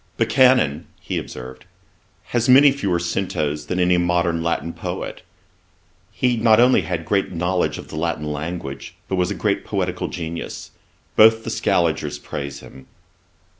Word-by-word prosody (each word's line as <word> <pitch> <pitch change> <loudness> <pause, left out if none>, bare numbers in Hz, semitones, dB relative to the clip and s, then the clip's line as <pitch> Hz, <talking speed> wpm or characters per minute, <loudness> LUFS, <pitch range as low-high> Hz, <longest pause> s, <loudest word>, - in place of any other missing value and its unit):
'Buchanan 110 - +3
(he - - -3
observed,) 65 0 -9 0.6
has 120 -1 0
fewer 135 -8 +5
centos 75 -4 -2
than 90 - -2
any 90 0 +3
modern 85 -1 +1
Latin 85 0 -2
poet. - - -6 0.9
He 125 -2 0
not 110 -1 +4
only 125 +1 +5
had 85 -3 -4
great 100 +3 0
knowledge 90 +1 -1
of - - -10
the - - -8
Latin 80 -1 -2
language, 75 -3 -6
but 95 - -2
was 90 -1 +1
a - - -3
great - - -1
poetical - - -2
genius. 85 -1 -6 0.4
Both 110 +1 +6
the - - -4
Scaligers 75 -4 0
praise 70 -1 -6
him.' 65 - -14
85 Hz, 140 wpm, -21 LUFS, 75-110 Hz, 0.9 s, Both